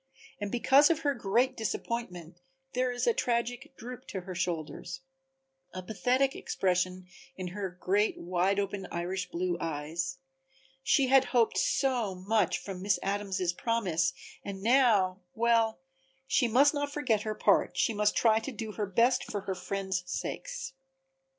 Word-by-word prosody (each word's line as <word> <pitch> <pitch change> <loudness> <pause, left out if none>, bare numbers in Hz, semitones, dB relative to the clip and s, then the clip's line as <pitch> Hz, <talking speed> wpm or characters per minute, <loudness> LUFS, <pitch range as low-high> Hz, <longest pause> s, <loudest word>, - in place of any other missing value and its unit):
And 205 -1 -4
because 270 +4 +5
of 325 -1 +1
her 285 -2 +1
great 240 +3 +1
disappointment 185 -7 -4 0.3
there 255 0 +1
is 245 - -2
a 470 - +4
tragic 245 - -2
droop 250 +2 -9
to 190 - -5
her 185 +1 -7
shoulders, 175 - -4 0.7
a 185 - -5
pathetic 250 +7 +1
expression 185 0 -1 0.3
in 185 -1 -5
her 195 +1 -4
great 205 +4 +1
wide 185 +3 0
open 200 -1 -3
Irish 180 +2 -3
blue 175 0 -2
eyes. 165 - -3 0.6
She 265 -1 +3
had 270 0 +6
hoped 240 -3 +2
so 245 -8 +1
much 200 +1 +1
from 190 -2 -7
Miss 200 +1 +2
Adams' 195 -3 -1
promise 180 -6 0 0.3
and 195 -1 -6
now 220 -7 +4 0.2
well, 230 -1 +2 0.5
she 265 -1 +2
must 270 +6 +5
not 290 -1 -2
forget 250 -8 +1
her 215 0 -3
part, - - +2
she 230 - +2
must 210 0 +1
try 220 -1 +4
to 250 +5 -6
do 220 -2 -5
her 210 -1 -3
best 235 +6 +3
for 205 - -2
her 190 0 -3
friends' 190 0 -3
sakes. - - -4
210 Hz, 150 wpm, -30 LUFS, 185-245 Hz, 0.7 s, had